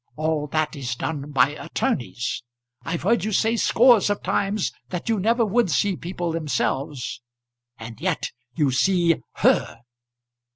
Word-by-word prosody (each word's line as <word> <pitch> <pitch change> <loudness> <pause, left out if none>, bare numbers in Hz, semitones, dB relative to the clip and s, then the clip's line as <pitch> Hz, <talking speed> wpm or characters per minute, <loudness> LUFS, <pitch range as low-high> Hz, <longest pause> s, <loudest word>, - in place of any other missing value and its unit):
All 155 -1 -1
that 155 +1 -1
is 125 -3 -3
done 145 +2 -4
by 135 -2 +4
attorneys. 140 - -2 0.4
I've 165 -1 -3
heard 220 +1 +2
you 215 - -1
say 225 +3 +2
scores 235 -2 +5
of 205 - -1
times 200 0 0 0.2
that 180 +4 -4
you 225 -2 +2
never 230 +4 +2
would 220 0 +2
see 195 +4 +1
people 175 0 -4
themselves, 140 -4 -2 0.6
and 115 +3 -9
yet 180 -2 -1 0.2
you 145 -4 +2
see 170 +5 +3 0.2
her. 115 - +1
165 Hz, 140 wpm, -23 LUFS, 140-205 Hz, 0.6 s, scores